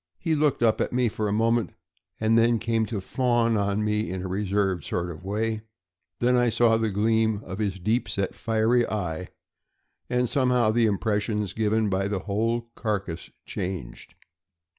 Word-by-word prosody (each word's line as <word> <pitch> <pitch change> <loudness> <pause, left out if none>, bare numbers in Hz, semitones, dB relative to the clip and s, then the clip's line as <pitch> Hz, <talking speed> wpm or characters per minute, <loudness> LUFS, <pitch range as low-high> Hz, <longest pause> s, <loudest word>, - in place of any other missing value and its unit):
He 165 - -1
looked 150 -5 +2
up 110 -2 +3
at - - -1
me 125 -1 +2
for 105 0 -2
a - - -1
moment, 115 +2 +1 0.4
and 110 +1 +2
then 115 +1 +4
came 115 -1 0
to 110 -4 -3
fawn 120 +2 +1
on 100 0 0
me 105 -3 0
in 90 0 -4
a - - -3
reserved 95 -2 0
sort 85 +4 -2
of 80 0 -10
way; 110 +3 -1 0.6
then 125 +1 +2
I 120 -1 +3
saw 115 0 +4
the 110 -1 +1
gleam 110 +1 +1
of 95 +3 -7
his 100 -3 -1
deep 110 +5 0
set, 100 -1 -1
fiery 115 +2 +2
eye, 90 -4 -3 0.8
and 125 0 +1
somehow 125 -3 +2
the 115 0 +3
impression 105 +1 0
given 110 0 +1
by 95 0 0
the 100 -2 -2
whole 115 +3 -1
carcass 100 -7 -3 0.2
changed. 90 -10 -6
110 Hz, 170 wpm, -26 LUFS, 100-115 Hz, 0.8 s, then